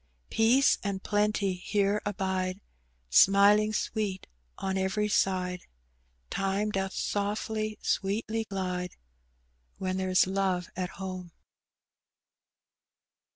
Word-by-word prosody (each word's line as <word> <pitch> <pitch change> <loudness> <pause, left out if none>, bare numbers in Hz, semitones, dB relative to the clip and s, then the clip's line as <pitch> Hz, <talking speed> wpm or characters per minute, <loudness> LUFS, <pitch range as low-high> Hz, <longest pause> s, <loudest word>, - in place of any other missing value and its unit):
Peace 245 +5 +4
and 195 -1 -3
plenty 205 -2 +1
here 200 +3 0
abide, 190 -2 -2 0.5
SmiHng 205 - +6
sweet 205 -4 -2 0.3
on 190 0 -2
every 190 +3 0
side; 185 -3 0 0.6
Time 195 +2 0
doth 195 -1 -2
softly, 215 +1 -2
sweetly 220 +3 -1
glide, 180 -3 -3 0.8
When 185 0 -2
there's 185 -1 +3
love 190 -1 -1
at 180 -1 -2
home." 185 -3 -6
195 Hz, 90 wpm, -29 LUFS, 185-210 Hz, 0.8 s, SmiHng